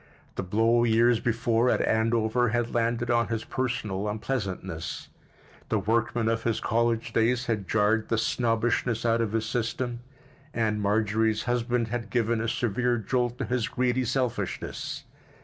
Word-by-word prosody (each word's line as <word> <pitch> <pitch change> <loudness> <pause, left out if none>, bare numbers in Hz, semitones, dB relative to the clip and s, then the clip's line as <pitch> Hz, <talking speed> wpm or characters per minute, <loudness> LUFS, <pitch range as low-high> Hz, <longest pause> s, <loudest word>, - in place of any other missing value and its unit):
The - - -3
blow 115 +5 +2
years 115 0 +4
before 115 +1 +1
at - - +2
Andover 115 +2 +2
had 120 +1 -1
landed 120 +1 0
on 115 -2 +2
his 115 -1 -2
personal 110 -7 -2
unpleasantness; 95 - -4 0.6
the - - +2
workman 115 +1 0
of 115 0 +1
his 115 -1 0
college 115 0 0
days 120 +2 +2
had 105 -5 -2
jarred 110 +1 +2
the 115 - +1
snobbishness 115 0 0
out 115 0 +3
of 110 -2 -1
his 115 -1 0
system, 120 +1 -2 0.6
and 110 -2 0
Marjorie's 110 +1 +1
husband 120 -1 0
had 115 -2 -4
given 115 -1 +1
a 115 - -1
severe 120 +1 0
jolt 120 +2 -1
to - - -2
his 125 -3 -1
greedy 125 0 0
selfishness. 125 -1 -3
115 Hz, 150 wpm, -27 LUFS, 110-120 Hz, 0.6 s, years